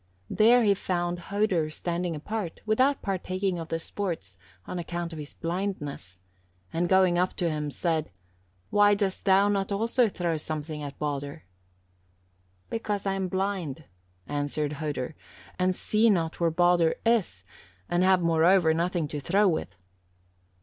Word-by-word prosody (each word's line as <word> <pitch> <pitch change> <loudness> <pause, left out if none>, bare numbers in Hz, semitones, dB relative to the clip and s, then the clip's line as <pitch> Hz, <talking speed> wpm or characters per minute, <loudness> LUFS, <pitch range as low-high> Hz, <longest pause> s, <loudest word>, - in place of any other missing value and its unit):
There 235 +3 +5
he 205 -2 +5
found 175 -2 -2
Hodur 195 -6 +1
standing 170 +1 -3
apart, 185 +3 -5
without 255 +6 +2
partaking 185 -1 -2
of 165 - -6
the 165 - -1
sports, 165 - -4 0.3
on 180 - -5
account 170 0 -4
of 160 - -7
his 150 -1 -8
blindness, 165 - -4 0.6
and 170 +1 0
going 185 -2 +4
up 180 +1 +1
to 175 - 0
him, 150 -2 -2
said, 160 +1 -1 0.6
'Why 205 0 +5
dost 200 -2 -2
thou 195 +1 +5
not 200 -1 0
also 230 +3 +2
throw 170 -4 -1
something 155 0 -4
at 145 -1 -7
Baldur?" 145 +1 -4 1.3
"'Because 210 -3 -2
I 195 - +1
am 190 -1 -1
blind,' 185 -6 -2 0.4
answered 145 +1 -2
Hodur, 145 -2 -3 0.5
'and 185 0 +2
see 220 +4 +2
not 170 -5 0
where 170 -1 +3
Baldur 175 0 +3
is, 215 - +1 0.4
and 175 +1 +1
have, 185 -1 +4
moreover, 165 +1 +4
nothing 170 -1 0
to 150 - -4
throw 195 +9 +3
with.' 155 - -1
175 Hz, 145 wpm, -27 LUFS, 160-195 Hz, 1.3 s, There